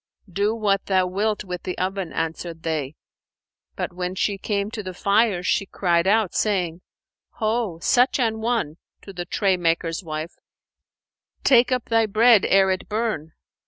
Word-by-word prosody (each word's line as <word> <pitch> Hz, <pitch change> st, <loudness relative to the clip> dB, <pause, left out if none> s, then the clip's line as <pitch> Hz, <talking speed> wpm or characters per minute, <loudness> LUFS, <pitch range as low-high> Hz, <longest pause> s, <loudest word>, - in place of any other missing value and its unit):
"Do 205 Hz, +4 st, +1 dB
what 200 Hz, -3 st, 0 dB
thou 185 Hz, -2 st, +3 dB
wilt 205 Hz, +4 st, -1 dB
with 180 Hz, -3 st, -6 dB
the 180 Hz, -, -5 dB
oven," 190 Hz, -2 st, -2 dB
answered 165 Hz, 0 st, -4 dB
they; 155 Hz, -3 st, -2 dB, 0.8 s
but, -, -, -4 dB
when 180 Hz, +1 st, -4 dB
she 200 Hz, +1 st, -1 dB
came 200 Hz, +1 st, -2 dB
to 220 Hz, -, -5 dB
the 185 Hz, -2 st, -7 dB
fire, 200 Hz, -1 st, +2 dB
she 195 Hz, +1 st, 0 dB
cried 175 Hz, -2 st, +1 dB
out, 210 Hz, -2 st, +2 dB
saying, 180 Hz, -5 st, 0 dB, 0.5 s
"Ho, 220 Hz, -5 st, -1 dB
such 250 Hz, +2 st, +3 dB
an 225 Hz, -3 st, 0 dB
one 225 Hz, -10 st, -1 dB, 0.3 s
(to 195 Hz, -, -10 dB
the 175 Hz, -1 st, -5 dB
tray 190 Hz, +1 st, +1 dB
maker's 165 Hz, +1 st, -1 dB
wife) 155 Hz, 0 st, -5 dB, 1.1 s
take 245 Hz, -1 st, +5 dB
up 250 Hz, -2 st, 0 dB
thy 225 Hz, -1 st, +2 dB
bread 220 Hz, 0 st, +5 dB
ere 195 Hz, 0 st, +4 dB
it 185 Hz, -, -3 dB
burn!" 215 Hz, -8 st, -2 dB
195 Hz, 160 wpm, -23 LUFS, 175-220 Hz, 1.1 s, take